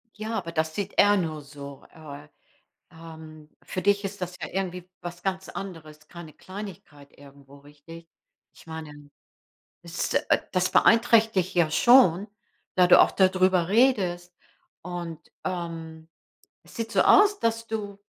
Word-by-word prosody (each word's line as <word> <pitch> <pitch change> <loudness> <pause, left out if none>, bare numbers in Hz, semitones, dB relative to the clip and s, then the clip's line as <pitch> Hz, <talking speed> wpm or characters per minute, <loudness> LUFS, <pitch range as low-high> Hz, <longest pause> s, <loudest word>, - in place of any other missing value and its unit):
Ja, 220 +1 -4
aber 170 - -6
das 160 -1 -2
sieht 200 -1 -4
er 205 0 +6
nur 155 -5 -3
so. 140 -1 -11
Äh, 150 -2 -11 0.6
ähm, 160 -2 -13
für 185 - -5
dich 205 0 +2
ist 195 -1 -6
das 180 0 -5
ja - - -4
irgendwie 180 -1 -4
was 175 0 -8
ganz 190 0 -3
anderes, 155 -5 -9
keine 170 -3 -11
Kleinigkeit 185 -7 -11
irgendwo, 140 0 -17
richtig? 150 +4 -14 0.5
Ich - - -19
meine, 150 -2 -9 0.7
es 170 0 -4
äh, - - +2
das 185 -1 0
beeinträchtigt 220 -5 +3
ja 170 -3 +3
schon, 210 -1 +5 0.5
da 180 -1 +5
du - - +7
auch - - +5
da 190 -1 +4
drüber 185 -2 +1
redest. 190 -7 +1 0.5
Und, 170 -2 -6 0.3
ähm, 165 -3 -6 0.6
es - - -18
sieht 230 0 -4
so - - +3
aus, 410 0 +5
dass 230 0 -1
du 205 -3 -5
175 Hz, 145 wpm, -25 LUFS, 160-195 Hz, 0.7 s, du